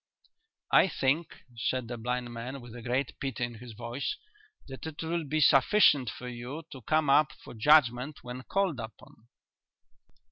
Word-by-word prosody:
"I - - +6
think," 150 0 -1
said 120 +2 -1
the 120 - -4
blind 120 +1 -3
man, 125 +4 -6
with 120 -2 -11
a 120 - -8
great 125 +3 -2
pity 135 -3 -3
in 120 0 -3
his 120 -1 -10
voice, 120 +5 -4 0.5
"that 135 +3 -8
it 160 0 -6
will 165 0 -2
be 155 +2 -1
sufficient 140 - +5
for 125 - -8
you 125 +6 -6
to 130 - -9
come 155 +5 +1
up 140 +1 +5
for - - -13
Judgment 130 +2 +3
when 125 +1 -7
called 185 -1 -1
upon." 110 0 -11
130 Hz, 165 wpm, -29 LUFS, 120-150 Hz, 0.5 s, I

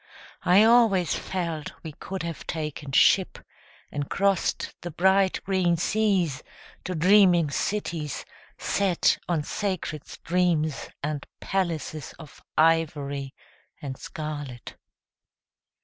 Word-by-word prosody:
I 185 +4 +6
always 225 -6 +4
felt 170 -5 -3
we 160 - -6
could 185 +4 -6
have 170 -2 -6
taken 150 -3 -4
ship 180 +7 +4 0.5
And 145 -1 -4
crossed 195 -2 0
the 175 - -5
bright 190 +3 +3
green 185 -3 +1
seas 190 -6 +1 0.4
To 185 - -3
dreaming 180 -2 +5
cities 165 -7 -2 0.3
set 195 -4 +1
on 165 -4 +1
sacred 180 -5 -3
streams 165 -4 0
And 145 -1 -3
palaces 165 -6 -3
Of 155 -3 -13 0.2
ivory 145 -4 +1 0.4
and 140 -4 -5
scarlet. 145 -5 -7
170 Hz, 100 wpm, -26 LUFS, 150-190 Hz, 0.5 s, I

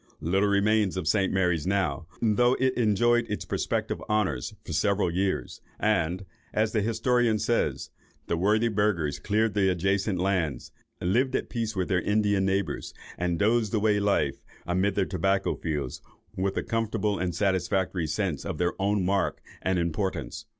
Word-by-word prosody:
Little 95 +5 +1
remains 100 -1 +2
of 90 -4 -3
St. 95 +2 +2
Mary's 90 -4 +1
now, 95 -6 0 0.2
though 120 +3 +3
it 130 0 +2
enjoyed 120 +1 +2
its 105 - -3
prospective - - -2
honours 105 -12 0
for - - -5
several 100 -3 +1
years; 95 +2 -2 0.2
and, 95 -3 0 0.3
as 110 0 +2
the 110 - +1
historian 115 +1 +2
says, 115 +3 -1 0.3
"the - - -1
worthy 105 +6 +2
burghers 95 -10 0
cleared 105 +5 +1
the 100 -2 +3
adjacent 95 +2 0
lands, 85 -8 -1 0.3
lived 130 +9 +1
at - - -2
peace 115 -3 -3
with 95 -2 -1
their 90 -2 +1
Indian 105 -1 +2
neighbours, 95 -5 -2 0.2
and 90 -1 -1
dozed 110 +1 +2
away 105 -1 +2
life, 100 0 0 0.2
amid 95 +3 +1
their 100 - +2
tobacco 95 +2 0
fields, 75 -6 -4 0.3
with 95 +1 -1
a - - 0
comfortable 110 -3 -1
and 90 -1 -2
satisfactory 95 -3 0
sense 85 -1 -2
of - - -4
their 90 0 +1
own 100 -1 +1
mark 100 +1 0 0.2
and 95 0 0
importance." 85 +3 -2
100 Hz, 155 wpm, -27 LUFS, 90-110 Hz, 0.3 s, though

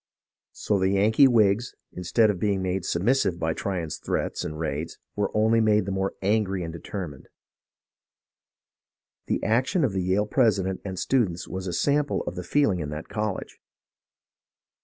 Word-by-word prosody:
So 105 -2 -1
the 95 0 +2
Yankee 110 +7 +5
Whigs, 110 -1 +2 0.2
instead 105 +5 +2
of 95 - -6
be 100 +2 +1
ing 95 -1 -2
made 95 -1 -2
submissive 95 -1 +1
by 80 -1 -1
Tryon's 85 -4 -3
threats - - -2
and 75 - -5
raids, 80 0 -3 0.2
were 105 -1 0
only 110 +1 +4
made 105 -3 +3
the 100 - -3
more 95 0 -1
angry 100 -2 +1
and 80 -1 -5
determined. 85 -5 -7 2.0
The - - -1
action 130 - +2
of 120 -8 +1
the 95 - 0
Yale 95 +3 +1
president 105 -6 +1
and 95 -2 -5
students 95 -10 0
was 95 0 -5
a - - -2
sample 145 - +1
of - - -4
the - - -4
feel 145 -7 +2
ing 90 - -2
in 75 -3 -4
that 75 +2 -7
college. 105 -1 -4
95 Hz, 165 wpm, -26 LUFS, 90-110 Hz, 2.0 s, Yankee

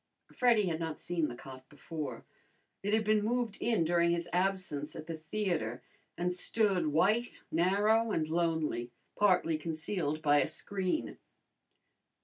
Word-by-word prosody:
Freddy 235 -5 +4
had 165 -3 -1
not 160 -2 -4
seen 170 -3 -1
the 120 - -6
cot 130 0 -11
before. 150 +1 -6 0.6
It 205 - -2
had 220 +1 +3
been 215 0 +2
moved 235 -2 -1
in 225 -7 +2
during 170 +1 +3
his 170 0 0
absence 180 -5 -1
at 155 - -7
the 165 - -5
theatre, 160 - -2 0.3
and 180 +1 0
stood 190 -2 +1
white, 200 +11 +1
narrow, 205 +7 +3
and 155 -5 0
lonely, 160 -7 0 0.3
partly 180 -6 +3
concealed 155 -1 -2
by 145 -1 +5
a - - +1
screen. 195 +8 -2
175 Hz, 140 wpm, -32 LUFS, 155-205 Hz, 0.6 s, by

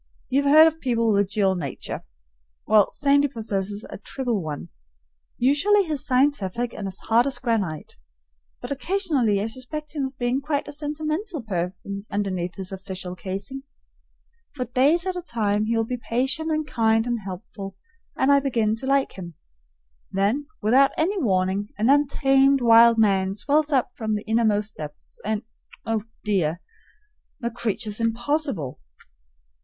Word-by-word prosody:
You 270 +2 +3
have 280 0 +2
heard 310 +2 +9
of 320 0 +1
people 230 -3 +1
with 200 - +4
a 195 - -9
dual 200 -2 +2
nature; 155 -8 -5 0.6
well, 210 -1 +5
Sandy 285 0 +3
possesses 205 -5 -3
a - - -9
triple 240 -1 -2
one. 150 - -6 0.7
Usually 295 +11 +4
he's 305 -5 -2
scientific 245 -4 +1
and 200 - -5
as 190 0 -4
hard 235 +3 +2
as 270 - 0
granite, 220 - -2 0.6
but - - -7
occasionally 280 - 0
I 200 - -1
suspect 260 +7 -4
him 280 -2 0
of 265 0 -7
being 245 +2 0
quite 290 0 -2
a - - -6
sentimental 305 - -3
person 190 0 -4
underneath 185 -4 -2
his 190 0 -6
official 190 -1 -6
casing. 195 +9 -6 0.9
For 255 -3 -2
days 280 +9 +3
at 375 -1 -2
a 360 - -3
time 215 - 0
he 230 +1 0
will 225 - +1
be 250 +2 -3
patient 265 +7 -1
and 310 0 0
kind 225 -4 +2
and 240 -1 -1
helpful, 195 0 -8 0.4
and 265 +2 +3
I 280 - +6
begin 230 -6 +1
to 265 - -5
like 275 0 +2
him; 170 -3 -8 0.8
then 210 +10 0 0.2
without 260 +6 +5
any 380 +6 +1
warning 190 -2 0
an 220 +5 +3
untamed 275 -1 +4
wild 230 -1 +7
man 195 -3 +2
swells 300 +7 +1
up 260 -3 +2
from 220 -5 -2
the 210 - -4
innermost 215 -2 +1
depths, 150 -1 -10
and 215 +1 -2 0.4
oh, 225 -1 -1 0.2
dear! 175 -6 0 0.8
the 235 -1 -3
creature's 220 -2 -2
impossible. 230 - -1
230 Hz, 155 wpm, -24 LUFS, 200-275 Hz, 0.9 s, heard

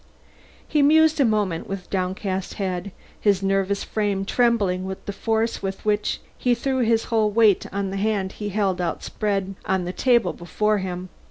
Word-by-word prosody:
He 300 - +2
mused 315 +2 +5
a 275 - +5
moment 205 -7 0
with 195 -2 -5
downcast 190 0 -2
head, 185 -1 -3 0.3
his 200 -2 +2
nervous 195 0 +1
frame 205 -2 -1
trembling 205 -6 +2
with 190 0 -6
the 200 - -4
force 225 +2 -1
with 195 +1 -5
which 210 0 0 0.2
he 245 -1 +2
threw 260 +2 -1
his 230 -2 +2
whole 220 -2 +3
weight 215 -2 +4
on 195 -1 -2
the 195 - -3
hand 200 -2 0
he 205 0 -5
held 195 -3 0
outspread 195 +3 -2
on 190 -2 0
the 180 - -4
table 235 -7 +2
before 210 +5 0
him. 185 -1 -5
200 Hz, 170 wpm, -23 LUFS, 190-220 Hz, 0.3 s, mused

